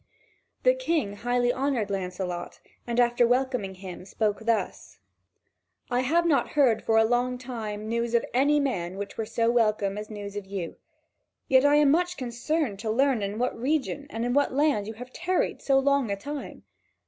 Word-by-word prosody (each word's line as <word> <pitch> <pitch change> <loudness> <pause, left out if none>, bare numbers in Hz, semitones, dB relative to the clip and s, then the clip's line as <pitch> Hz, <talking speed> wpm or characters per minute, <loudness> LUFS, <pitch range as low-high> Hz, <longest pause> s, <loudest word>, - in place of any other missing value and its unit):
The - - +6
King 335 - -1
highly 245 +2 +1
honoured 260 -6 -1
Lancelot, 180 -2 -4 0.3
and 235 0 0
after 240 0 +4
welcoming 250 -6 0
him, 185 -1 -8
thus 185 - -13
spoke: 210 0 -1 1.5
"I 245 - +2
have 325 +7 +2
not 285 -7 +2
heard 260 -7 +3
for 225 - +2
a 225 - +6
long 245 +2 +1
time 220 -4 -6
news 235 +1 -1
of 235 - +2
any 285 +4 +3
man 190 -10 -2
which 200 0 -6
were 225 - -3
so 230 +1 +1
welcome 215 -4 +1
as 210 - -7
news 205 -2 -7
of 205 -2 -5
you; 190 -4 -5 0.7
yet 260 +1 +5
I 290 0 +5
am 295 -2 +5
much 355 +3 +1
concerned 245 -1 -2
to 220 +1 -3
learn 260 +1 +2
in 200 +1 -3
what 250 +2 -1
region 285 +2 -1
and 225 -1 -3
in 245 - 0
what 285 +1 +2
land 285 -8 +2
you 220 - -5
have 250 +3 -10
tarried 360 +1 -1
so 270 -1 +3
long 275 -3 +2
a 200 - 0
time. 285 +8 -7
240 Hz, 185 wpm, -27 LUFS, 210-275 Hz, 1.5 s, The